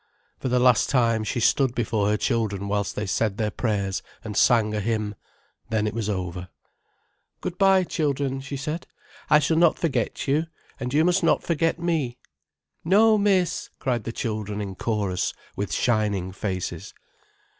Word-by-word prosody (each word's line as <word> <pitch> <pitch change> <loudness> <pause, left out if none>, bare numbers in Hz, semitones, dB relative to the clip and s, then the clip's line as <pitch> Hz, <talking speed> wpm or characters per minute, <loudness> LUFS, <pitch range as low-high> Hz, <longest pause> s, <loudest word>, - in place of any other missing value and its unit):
For 130 - -2
the 125 - +2
last 125 -2 +4
time, 115 -4 +2
she 110 - -2
stood 130 +2 +2
before 110 -3 0
her 105 - +2
children 105 -5 -1
whilst 100 0 -1
they 105 - -2
said 105 +1 0
their 110 -2 0
prayers 100 -5 -1 0.2
and 105 -2 -6
sang 110 -1 +4
a 105 - 0
hymn. 105 -1 -1 0.6
Then 110 -1 +1
it 105 - -2
was 110 -2 -2
over. 90 -2 -4 0.9
"Good 180 - -5
bye, 195 -1 +5
children," 140 -5 -1
she 140 +1 -5
said. 150 +5 -4 0.4
"I 150 - +7
shall 155 +2 +1
not 170 -1 +4
forget 135 -7 -1
you, 150 +4 +1 0.3
and 125 -2 -3
you 155 +4 +3
must 180 +1 +3
not 165 - +2
forget 165 0 +1
me." 160 -8 -1 0.7
"No, 215 +6 +5
miss," 190 -4 +1
cried 125 -5 -1
the 115 - -3
children 105 -3 -3
in 100 -2 -4
chorus, 100 -3 -1 0.2
with 100 -3 -3
shining 100 -2 0
faces. 95 -2 -4
115 Hz, 165 wpm, -25 LUFS, 105-150 Hz, 0.9 s, I